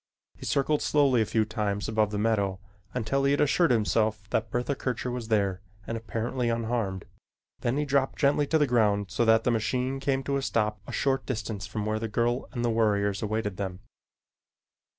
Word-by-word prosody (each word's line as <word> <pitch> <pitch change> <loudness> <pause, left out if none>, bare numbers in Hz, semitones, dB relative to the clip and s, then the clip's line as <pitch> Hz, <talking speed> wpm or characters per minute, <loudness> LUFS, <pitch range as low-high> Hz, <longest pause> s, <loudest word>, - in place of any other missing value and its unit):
He - - -9
circled 145 +2 +1
slowly 140 -5 +3
a 110 - 0
few 110 0 +1
times 105 -2 -2
above 110 -1 +1
the 105 - -3
meadow 100 -3 +1 0.3
until 125 +3 -1
he 140 0 +3
had 145 - +1
assured 165 +4 +3
himself 110 -2 +1
that 110 -1 0
Bertha 120 +5 -1
Kircher 125 -2 -3
was 120 -2 -4
there 100 -4 +1 0.2
and 115 - -3
apparently 115 +2 -2
unharmed, 115 -5 -1 0.5
then 120 +3 0
he 150 - 0
dropped 140 -1 +1
gently 145 0 +2
to 160 - +3
the 150 - +3
ground 105 -6 +2
so 120 - +1
that 110 0 +5
the 125 - +2
machine 125 +4 -1
came 135 -1 0
to 140 +1 0
a - - -1
stop 105 -5 0
a - - -6
short 135 -1 0
distance 110 -4 -3
from 105 -2 -4
where 110 0 -1
the 115 - -2
girl 120 +3 0
and 120 -2 -2
the 120 - +2
warriors 100 -3 +1
awaited 105 -3 -2
them. 95 -2 -4
115 Hz, 195 wpm, -27 LUFS, 105-130 Hz, 0.5 s, that